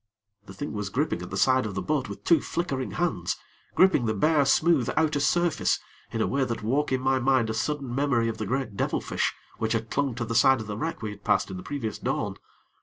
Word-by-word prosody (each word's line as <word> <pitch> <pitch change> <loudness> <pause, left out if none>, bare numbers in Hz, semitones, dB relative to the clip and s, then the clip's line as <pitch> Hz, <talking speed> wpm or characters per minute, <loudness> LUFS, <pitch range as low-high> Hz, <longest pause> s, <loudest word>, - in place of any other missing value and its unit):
The - - -9
thing 145 - -5
was 105 -2 -3
gripping 140 +9 -1
at - - -7
the - - -4
side 130 -3 +3
of 100 - -6
the 95 - -1
boat 145 -6 -1
with 100 0 -8
two 170 - +4
flickering 135 -7 -3
hands 115 - -1 0.4
gripping 185 -11 +4
the 110 - 0
bare, 150 +6 +3
smooth 150 -1 +3
outer 155 -2 +2
surface, 175 +3 +2 0.3
in 115 - -2
a - - +1
way 135 0 +1
that 115 -3 -3
woke 135 +7 0
in 130 - +2
my 130 0 +2
mind 130 -3 +2
a - - -2
sudden 135 +2 -2
memory 125 -4 +1
of 110 -1 -3
the 110 - -3
great 125 -3 -2
devilfish - - -1 0.3
which 110 0 0
had 115 -1 -2
clung 140 -4 0
to 120 0 -3
the 115 - -3
side 130 +2 +5
of 110 - -5
the 105 -1 -5
wreck 160 +1 -4
we 105 - -3
had 100 0 -12
passed 100 -1 +1
in 95 - -5
the - - -6
previous 115 -2 -4
dawn. - - -2
130 Hz, 240 wpm, -26 LUFS, 110-145 Hz, 0.4 s, side